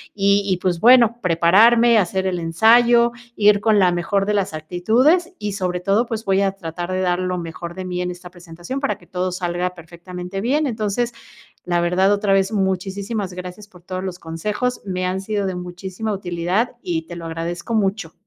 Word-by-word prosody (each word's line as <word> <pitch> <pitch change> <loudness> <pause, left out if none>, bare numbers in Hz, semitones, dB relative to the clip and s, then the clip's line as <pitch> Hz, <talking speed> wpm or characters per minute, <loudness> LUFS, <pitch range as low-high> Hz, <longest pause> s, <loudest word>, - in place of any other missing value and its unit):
y 200 0 +3
y 190 -2 0
pues 175 -2 0
bueno, 235 +1 +6
prepararme, 220 +7 +5
hacer 190 -1 0
el 185 -2 -1
ensayo, 235 +8 +4 0.2
ir 205 -1 +4
con 215 -1 +3
la 185 -2 +4
mejor 185 +3 0
de 210 - 0
las 200 -4 -1
actitudes, 230 - +1
y 210 0 -3
sobre 180 -2 -2
todo 200 +6 +2
pues 225 -2 -4
voy 195 0 +1
a 195 -1 +1
tratar 175 -2 -6
de 185 - -1
dar 180 -1 +1
lo 185 0 -2
mejor 170 0 -7
de 185 - -5
mí 180 -1 -4
en 180 - -2
esta 180 0 -9
presentación 175 +8 -7
para 275 - -1
que 175 - -20
todo 180 0 -3
salga 180 0 -2
perfectamente 180 +2 -8
bien. 280 +8 +1
Entonces, 230 0 -2 0.5
la 175 -1 +1
verdad, 185 +3 +2
otra 205 0 0
vez, 195 +2 +2
muchísisimas 195 +1 -2
gracias 180 +3 -8
por 180 -4 -18
todos 185 +1 -5
los 180 -1 -5
consejos, 210 +10 -3
me 185 -1 -2
han 185 +1 -1
sido 200 0 -2
de 185 - -3
muchísima 185 +4 -5
utilidad 190 +5 -1
y 165 -2 -2
te 175 - -8
lo 170 - -8
agradezco 170 +6 -4
mucho. 195 -5 -1
190 Hz, 195 wpm, -20 LUFS, 175-210 Hz, 0.5 s, bueno